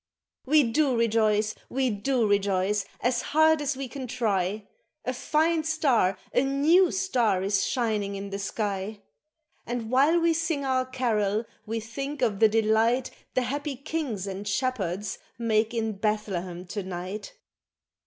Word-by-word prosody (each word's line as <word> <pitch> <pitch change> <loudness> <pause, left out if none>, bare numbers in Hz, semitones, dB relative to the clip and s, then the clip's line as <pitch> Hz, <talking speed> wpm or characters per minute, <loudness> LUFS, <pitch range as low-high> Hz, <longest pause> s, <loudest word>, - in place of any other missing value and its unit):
We 300 +2 +6
do 260 +2 +2
rejoice, 215 -2 +2 0.2
we 260 -1 0
do 235 +4 0
rejoice, 200 0 +1 0.2
as 245 0 +1
hard 315 0 +3
as 285 -1 -1
we 270 -1 -4
can 260 +1 -6
try, 210 -4 -1 0.4
A 255 - -1
fine 315 +5 +1
star, 275 -12 +2 0.2
a - - +4
new 300 +7 +4
star 245 - +1
is 195 0 +1
shining 215 -5 -1
in 200 0 -6
the 200 - -3
sky! 205 0 -3 0.6
And 240 -1 -4
while 285 +7 +4
we 335 0 +3
sing 320 -3 -1
our 255 -1 +1
carol, 225 -4 0 0.2
we 225 +1 -2
think 275 +5 -5
of 210 -5 +1
the 220 - +6
delight 225 +3 +2 0.2
The 255 - +2
happy 285 +3 -3
kings 275 - -3
and 195 +1 -5
shepherds 200 -4 -2 0.2
make 225 -1 +1
in 225 -2 -1
Bethlehem 195 -4 -2
to 205 - -3
night. 185 +2 -6
230 Hz, 145 wpm, -27 LUFS, 205-270 Hz, 0.6 s, We